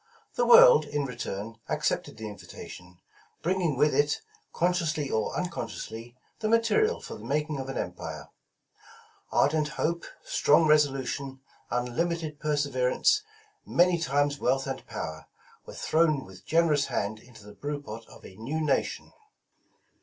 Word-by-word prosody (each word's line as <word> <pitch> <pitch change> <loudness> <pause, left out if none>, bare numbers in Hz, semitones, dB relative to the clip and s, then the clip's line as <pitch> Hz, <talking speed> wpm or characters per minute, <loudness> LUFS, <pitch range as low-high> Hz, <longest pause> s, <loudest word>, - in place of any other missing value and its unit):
The - - +1
world, 485 0 +9
in 145 -1 -2
return, 115 -3 -5
accepted - - -1
the 110 -1 -6
invitation, 90 -3 -10 0.5
bringing 175 -5 +1
with 150 +2 +3
it, 145 0 +2 0.3
con 180 +1 +2
sciously 155 -5 -1
or 110 - 0
unconsciously, 120 -9 -5 0.2
the 215 -1 -1
material 230 - +3
for - - -8
the - - -10
making 150 0 -1
of 135 0 -5
an 135 - -4
empire. 80 -4 -5 1.0
Ardent 150 +1 +3
hope, 170 +3 -2 0.2
strong 150 +3 +4
resolution, 135 -3 +1 0.3
unlimited 150 +5 -2
perseverence, 145 - +2 0.4
many 175 0 +3
times 145 -1 +1
wealth 135 +2 +1
and 135 -1 -4
power, - - -6 0.4
were - - -9
thrown 155 -4 +2
with 95 0 -15
generous 160 -4 +3
hand 105 +2 -2
into 115 -2 -16
the 105 - -11
brew 145 +4 -4
pot 115 -5 -8
of - - -15
a 95 - -12
new 135 +9 -3
nation. 150 -3 -1
145 Hz, 140 wpm, -28 LUFS, 125-165 Hz, 1.0 s, world